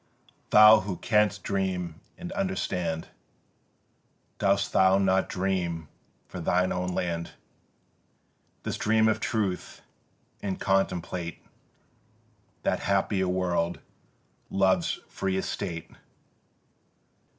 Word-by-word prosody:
Thou 110 +1 +9
who 95 -2 -4
canst 105 -3 +2
dream 90 -4 -2 0.2
and 180 0 -7
understand, 90 - -2 1.3
Dost 100 0 +1
thou 95 0 +5
not 95 -1 +2
dream 90 -4 -2 0.4
for - - -7
thine 90 +2 +1
own 90 0 -1
land 85 -2 -3 1.3
This - - -3
dream 110 0 +3
of 110 - +2
Truth, 100 -5 -2 0.6
and 95 -2 -3
contemplate 90 -3 -1 1.2
That - - +1
happier 100 -1 +1
world, 90 -2 0 0.7
Love's 95 -2 +2
free 95 -1 -2
Estate? 90 -3 -4
95 Hz, 90 wpm, -27 LUFS, 90-100 Hz, 1.3 s, Thou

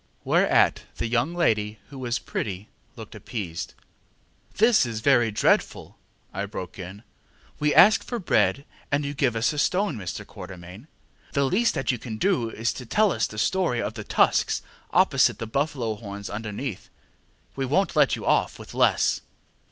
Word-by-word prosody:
ŌĆØ - - -40
Whereat - - +3 0.2
the - - -2
young 125 +8 0
lady, 110 -10 +1
who 135 - -9
was 125 -1 -1
pretty, 100 0 -5 0.3
looked 110 -3 -10
appeased. 100 -5 -6 0.8
ŌĆ£This 225 +1 +5
is 115 -2 -4
very 120 -2 +4
dreadful, 105 - 0 0.4
ŌĆØ 95 - -6
I 100 - -1
broke 95 -2 -7
in. 95 +4 -8 0.6
ŌĆ£We 150 0 +2
ask 210 +4 +7
for 245 - -4
bread 150 -7 +1 0.3
and 145 0 +1
you 140 - -3
give 130 -4 0
us 115 +7 +1
a 150 - -3
stone, 185 +1 +1
Mr. 90 -3 -6
Quatermain. 90 - -11 0.5
The 140 - +2
least 220 - +2
that 135 - 0
you 125 - -4
can 110 -2 -6
do 165 - +1
is 115 +1 -2
to 125 - -8
tell 210 - +3
us 110 - 0
the 105 - -11
story 125 - +1
of 110 - -2
the 110 -1 -7
tusks - - +2 0.3
opposite - - +4
and - - -20
the - - -5
buffalo 130 -1 -1
horns 100 -2 -8
underneath. 105 +1 -5 0.7
We 135 -1 -2
wonŌĆÖt 190 +9 +1
let - - +4
you - - -8
off - - +1
with - - -11
less. - - +2
120 Hz, 175 wpm, -25 LUFS, 105-145 Hz, 0.8 s, ask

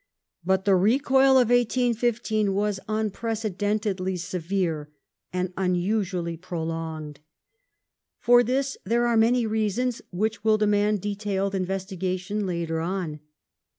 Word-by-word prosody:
But 190 +2 +1
the 195 -2 +5
recoil 265 +7 +4
of 245 -3 +4
1815 235 -4 +1
was 205 -1 0
unprecedentedly 210 -3 -1
severe 170 -3 -2 0.4
and 180 0 -2
unusually 180 -1 -1
pro 170 -1 -5
longed. 160 -2 -5 1.0
For 245 0 +5
this 265 +3 -1
there 235 +4 +1
were 240 -1 +2
many 230 +2 +3
reasons, 220 +3 -1
which 210 +3 -2
will 220 -1 +4
demand 210 -1 +2
detailed 200 -1 -2
investigation 190 +1 -2
later 170 -2 -2
on. 170 -3 -3
200 Hz, 110 wpm, -25 LUFS, 180-220 Hz, 1.0 s, the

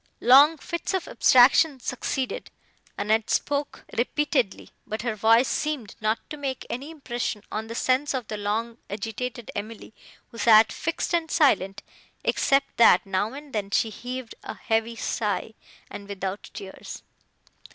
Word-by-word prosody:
Long 285 +6 +7
fits 340 +4 -3
of 375 - -3
abstraction 260 +3 +5
succeeded; 255 +1 -3 0.5
Annette 215 +2 +1
spoke 285 0 -1
repeatedly, 260 -3 0 0.2
but 215 +2 -4
her 235 -2 -1
voice 225 +4 +4
seemed 295 -9 -3
not 215 +1 -1
to 300 - -5
make 270 -3 -4
any 270 +5 -5
impression 245 -8 -4
on 220 +1 -4
the 230 - -7
sense 260 +4 +1
of 250 -4 -4
the 215 - -4
long 220 +3 -3
agitated 225 +3 -5
Emily, 215 +1 -7 0.4
who 230 - -11
sat 220 -1 +6
fixed 330 +1 -3
and 335 -2 +1
silent, 210 - +2 0.4
except 275 0 +1
that, 235 - +6
now 200 +4 -1
and 285 0 -10
then, 205 -2 -2
she 220 +2 +1
heaved 245 +2 -6
a - - -7
heavy 225 +1 -1
sigh, 220 -2 -2 0.4
but 200 - -8
without 195 0 -5
tears. 190 -1 -9
235 Hz, 145 wpm, -25 LUFS, 215-275 Hz, 0.5 s, Long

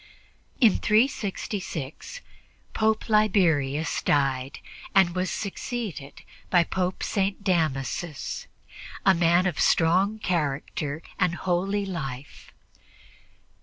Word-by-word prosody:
In 230 -8 +5
366 210 - -1 0.5
Pope 220 0 +1
Liberius 165 - +2
died 135 -2 0 0.4
and 190 -3 +5
was 185 0 -1
succeeded 195 - -5 0.3
by 175 -2 +5
Pope 185 +1 -2
St. 195 0 -1
Damasus, 155 -4 -2 0.6
a 190 - +7
man 170 +1 +3
of 180 -5 -1
strong 185 +6 +3
character 155 -4 -2 0.2
and 180 -1 +2
holy 190 +3 -1
life. 140 -7 -7
180 Hz, 90 wpm, -26 LUFS, 155-200 Hz, 0.6 s, a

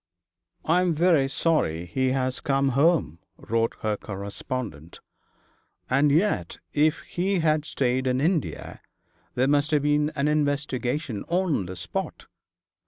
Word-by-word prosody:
'I 170 +3 +3
am 175 -3 +1
very 160 -4 +3
sorry 110 - 0
he 130 +10 -1
has 130 0 0
come 135 0 +1
home,' 140 - +2 0.2
wrote 115 +1 -1
her 110 -1 0
correspondent, 100 - -6 0.9
'and 140 +3 +4
yet 155 - +1 0.2
if 150 +1 +2
he 190 +3 -1
had 155 -1 +2
stayed 130 -2 0
in 130 0 +1
India 160 +1 -2 0.5
there 130 +2 +2
must 145 +1 +2
have 150 -2 +2
been 150 0 +2
an 140 +1 0
investigation 145 -5 -1
on 170 - 0
the 95 - -6
spot. 90 0 -5
140 Hz, 130 wpm, -25 LUFS, 120-155 Hz, 0.9 s, and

